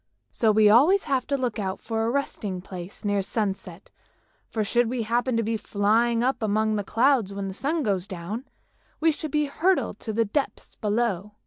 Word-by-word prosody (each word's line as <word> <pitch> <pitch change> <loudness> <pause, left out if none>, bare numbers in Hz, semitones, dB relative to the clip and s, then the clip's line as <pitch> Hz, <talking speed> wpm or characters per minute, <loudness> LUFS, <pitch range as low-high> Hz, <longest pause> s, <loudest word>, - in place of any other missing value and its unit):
So 220 -2 +2
we 215 0 +5
always 290 - +6
have 265 -4 -1
to 280 - 0
look 245 -4 -2
out 190 -1 -3
for 225 0 -2
a 225 - +1
resting 220 -8 -2
place 180 +2 -9
near 205 -1 +1
sunset, 195 -3 -4 0.6
for 220 - -1
should 240 +2 +1
we 245 -1 -2
happen 240 +2 0
to 230 - +1
be 225 +1 -1
flying 225 +3 +1
up 260 0 0
among 215 0 +1
the 205 - -1
clouds 230 -2 +2
when 200 -1 -3
the 190 - -5
sun 300 - -1
goes 195 -4 -1
down, 200 +6 -5 0.5
we 325 +1 +4
should 310 0 -5
be 300 0 +1
hurled 350 +6 0
to 220 - -5
the 225 +1 +1
depths 270 +7 -3
below. 210 -2 -1
225 Hz, 195 wpm, -25 LUFS, 205-250 Hz, 0.6 s, always